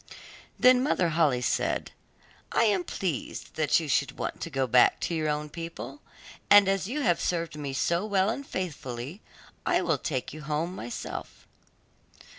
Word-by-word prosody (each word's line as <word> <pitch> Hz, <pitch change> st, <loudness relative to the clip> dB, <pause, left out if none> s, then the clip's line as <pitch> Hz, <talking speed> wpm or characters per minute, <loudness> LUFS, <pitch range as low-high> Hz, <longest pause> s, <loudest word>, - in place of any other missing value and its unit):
Then 250 Hz, 0 st, +6 dB
Mother 185 Hz, -, +2 dB
Holle 150 Hz, -6 st, +2 dB
said, -, -, 0 dB, 0.6 s
'I -, -, +4 dB
am 200 Hz, -5 st, +2 dB
pleased 175 Hz, -5 st, -4 dB
that 155 Hz, 0 st, +3 dB
you 160 Hz, -, -5 dB
should 140 Hz, 0 st, 0 dB
want -, -, -4 dB
to -, -, -4 dB
go 135 Hz, -3 st, 0 dB
back 125 Hz, 0 st, +5 dB
to -, -, -1 dB
your 155 Hz, -2 st, 0 dB
own 150 Hz, 0 st, -1 dB
people, 165 Hz, -, -7 dB, 0.5 s
and 205 Hz, -1 st, +8 dB
as 195 Hz, -1 st, +1 dB
you 285 Hz, +6 st, -2 dB
have 175 Hz, -10 st, +2 dB
served 170 Hz, -3 st, -1 dB
me 145 Hz, -2 st, -4 dB
so 170 Hz, +7 st, 0 dB
well 200 Hz, 0 st, +2 dB
and 280 Hz, -, -4 dB
faithfully, 150 Hz, -, -5 dB, 0.4 s
I -, -, +2 dB
will -, -, +1 dB
take 130 Hz, -5 st, -3 dB
you 155 Hz, -, -8 dB
home 155 Hz, +3 st, -2 dB
myself. 120 Hz, -7 st, -7 dB
165 Hz, 165 wpm, -28 LUFS, 145-190 Hz, 0.6 s, and